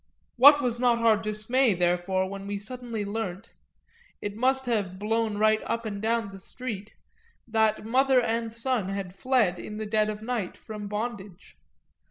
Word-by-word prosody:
What 285 +4 +8
was 240 -1 0
not 245 -1 +3
our 230 -1 +4
dismay 215 +3 +1
therefore 180 +2 +1
when 195 0 -7
we 205 0 -2
suddenly 230 0 -5
learnt 205 -1 -4 0.7
it 205 0 -5
must 265 +3 +2
have 205 -6 -1
blown 220 +1 -1
right 215 +1 +3
up 230 0 -2
and 200 -2 -4
down 225 -1 0
the 195 - -10
street 210 -1 -7 0.5
that 220 -2 +1
mother 260 +3 +4
and 230 -1 -1
son 230 -3 -1
had 195 -2 -4
fled, 210 -4 +1
in 210 - -7
the 215 - -4
dead 215 0 +1
of 215 0 -5
night, 225 -5 -3
from 210 -2 -8
bondage? 205 -3 -6
215 Hz, 165 wpm, -27 LUFS, 200-235 Hz, 0.7 s, What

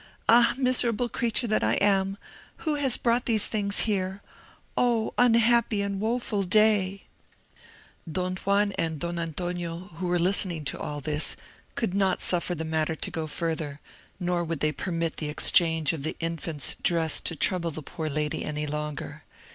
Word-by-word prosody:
Ah, 235 +1 +5
miserable 250 -2 +1
creature 235 0 0
that 215 - +1
I 110 +1 +2
am! 195 - +2 0.5
who 310 - +1
has 280 -4 +3
brought 240 +1 +1
these 220 -4 +3
things 200 -2 0
here? 195 -2 -1 0.5
Oh, 235 -3 +1
unhappy 235 -3 +4
and 200 -1 -3
woeful 220 -1 -1
day!" 200 0 +3 1.1
Don 185 +2 -1
Juan 200 +1 +1
and 160 -1 -1
Don 170 +3 -3
Antonio, 175 +2 -4
who 180 +1 -3
were 175 0 +1
listening 175 -3 +1
to - - -2
all 145 -1 -5
this, 150 +2 +2 0.4
could 225 -6 -1
not 195 -2 +1
suffer 175 0 +2
the 160 0 -4
matter 160 0 -1
to - - -3
go 160 -1 -4
further, 155 -2 -3 0.4
nor 175 -1 0
would 165 -2 -4
they 155 - +2
permit 165 +2 -3
the 150 - -3
exchange 160 0 +4
of 160 - -5
the 155 - -4
infant's 165 -2 -2
dress 165 -2 +1
to 165 - -1
trouble 170 +2 0
the 155 -1 -6
poor 155 +2 -5
lady 150 +1 -2
any 150 0 -3
longer. 150 0 -5
180 Hz, 165 wpm, -26 LUFS, 160-210 Hz, 1.1 s, Ah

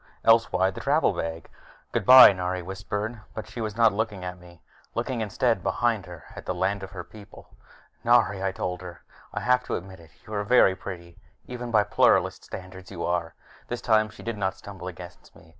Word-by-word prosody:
Else 115 0 +5
why 95 +1 +2
the - - -8
travel 150 +3 +2
bag? 80 0 -5 0.4
"Goodbye," 130 -5 +9
Nari 90 -1 -3
whispered, 105 +4 -5
but 110 - -6
she 120 - -7
was 110 -1 -4
not 115 -2 +5
looking 105 -3 -3
at 90 0 -6
me. 85 -2 -17 0.3
Looking, 120 0 -2
instead, 110 0 0
behind 100 +1 0
her, 85 -3 -11
at - - -10
the - - -2
land 100 +2 -1
of 95 - -7
her 95 -2 -7
people. 105 +1 -15 0.5
"Nari," 115 -5 +3
I 95 0 0
told 90 -1 -4
her, 90 -4 -10 0.3
"I - - -4
have 125 0 +2
to - - -2
admit 95 0 -8
it. 80 -1 -16 0.2
You 110 - -9
are 105 -1 -1
very 100 -3 +5
pretty 85 -3 -9 0.3
even 125 -1 -6
by 110 -3 +4
Pluralist - - +2
standards. 95 0 -10
You 85 -3 -5
are 85 -1 -2 0.2
" - - -25
This 120 - -4
time 110 -1 +3
she 110 - -13
did 115 -2 -4
not 95 -1 -1
stumble 95 -3 -9
against 90 0 -11
me. 80 - -18
100 Hz, 205 wpm, -26 LUFS, 90-115 Hz, 0.5 s, Goodbye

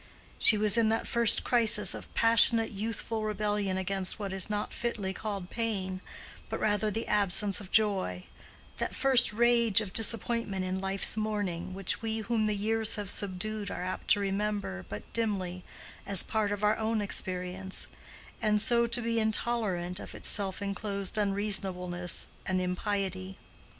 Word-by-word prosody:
She 215 - +7
was 215 +2 +3
in 220 -1 +3
that 225 +1 0
first 235 -2 +2
crisis 230 -3 +4
of - - -9
passionate 230 0 +4
youthful 225 +2 -4
rebellion 210 -2 -1
against 190 0 -2
what 200 -3 -5
is 190 +2 +3
not 210 0 -3
fitly 210 -5 -3
called 200 -3 -6
pain, 195 -5 -3 0.5
but - - -4
rather 210 0 +1
the 225 +2 -3
absence 200 0 +1
of 190 - -11
joy—that 190 - -3
first 260 -2 +6
rage 235 -1 +3
of 205 -4 -5
disappointment 225 -3 0
in 185 +1 -3
life's 195 +1 +1
morning, 205 -5 -3
which 195 -1 -2
we 225 -1 -2
whom 220 0 0
the 210 - 0
years 220 +2 +1
have 205 -3 -4
subdued 205 +1 -3
are - - -5
apt 185 - -5
to - - -1
remember 200 - -2
but 105 0 -6
dimly 190 -6 -2 0.4
as 195 -3 +8
part 215 -2 -1
of 205 0 -4
our 210 +1 +3
own 220 0 -1
experience, 185 -1 -1 0.6
and 210 -1 +2
so 235 +2 +3
to 235 +1 +1
be 230 0 0
intolerant 215 -5 -1
of - - -9
its - - 0
self 200 -1 0
enclosed 200 -1 -3
unreasonableness 190 -4 -1 0.2
and 185 0 0
impiety. 185 0 -3
205 Hz, 155 wpm, -29 LUFS, 190-220 Hz, 0.6 s, as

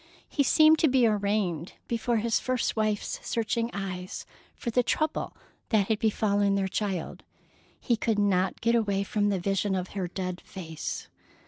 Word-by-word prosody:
He 290 - 0
seemed 310 +3 +6
to 320 - +5
be 260 -3 +4
arraigned 200 -6 0
before 235 0 0
his 225 +1 +1
first 255 -2 -1
wife's 215 -1 -1
searching 230 0 -1
eyes, 185 -2 -5 0.3
for 235 - -4
the 250 - +4
trouble 310 +5 -1 0.3
that 215 -3 +2
had 220 -2 +1
befallen 205 -2 +2
their 195 -1 +1
child. 190 -3 -3 0.6
He 240 - +1
could 220 -1 0
not 195 -2 +1
get 230 +1 +2
away 200 -4 +1
from 205 +1 0
the 200 - +1
vision 195 +2 0
of 185 0 -3
her 190 -3 -3
dead 180 0 -4
face. 165 -5 -6
205 Hz, 160 wpm, -28 LUFS, 190-230 Hz, 0.6 s, seemed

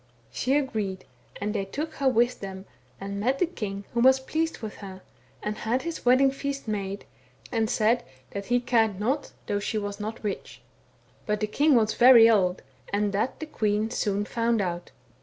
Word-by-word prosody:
She 265 +3 +1
agreed, 215 -9 -2 0.3
and 210 +1 -2
they 195 - -1
took 300 +10 -4
her 275 - +1
with 240 0 +2
them 190 -1 -7 0.3
and 200 +1 -5
met 255 +6 +1
the 360 - +3
king 205 - -5
who 235 - 0
was 260 +2 +6
pleased 320 +4 -2
with 220 -2 -7
her, 190 -2 -10 0.4
and 210 0 -3
had 240 +4 -1
his 335 -1 -5
wedding 255 +2 +5
feast 275 -1 -4
made, 200 -2 -3 0.5
and 225 -2 0
said 235 +1 +2 0.3
that 200 0 -5
he 245 0 +3
cared 225 -5 +1
not 265 +7 -1
though 205 - -1
she 210 +2 -2
was 205 -1 -4
not 215 +2 -5
rich. 205 -2 -5 0.6
But 210 0 0
the 215 - +1
king 285 +7 +3
was 220 -2 +3
very 240 -2 +8
old, 190 -5 +2 0.3
and 205 0 0
that 215 +6 -1
the 315 - -4
queen 215 -6 -1
soon 205 -4 -1
found 230 +1 0
out. 175 -2 -3
220 Hz, 185 wpm, -26 LUFS, 205-255 Hz, 0.6 s, very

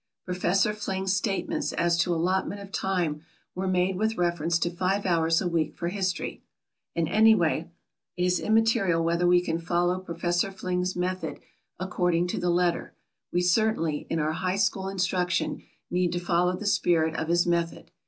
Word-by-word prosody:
Professor 185 +3 +1
Fling's 195 -2 -2
statements 195 0 -1
as 170 0 +2
to 170 +1 +1
allotment 185 +4 0
of 200 -1 -10
time 175 -7 -1 0.3
were 190 +1 -3
made 185 0 +1
with 220 +2 0
reference 170 -1 +1
to 170 0 -1
five 190 +3 -1
hours 165 -2 +2
a 185 - -1
week 160 -3 -1
for 170 - -3
history. 190 -1 -3 0.5
And, 165 -1 +1
anyway, 175 -6 +3 0.5
it 180 - 0
is 180 0 +2
immaterial 220 -6 +2
whether 170 +1 +1
we 175 0 +5
can 165 -2 -2
follow 175 +2 0
Professor 175 +1 -1
Fling's 185 -1 -2
method 185 +1 -3 0.4
according 180 -2 0
to - - -2
the 175 0 0
letter; 175 0 0 0.4
we 175 - +1
certainly, 180 -5 +1
in 165 - -1
our 155 0 0
high 185 +2 -1
school 195 -2 0
instruction, 180 -2 -1 0.3
need 180 -1 +1
to 175 - -1
follow 175 +1 +1
the 210 - -7
spirit 170 -6 +2
of 160 - -2
his 175 +1 +3
method. 170 -1 -1
180 Hz, 165 wpm, -27 LUFS, 170-190 Hz, 0.5 s, we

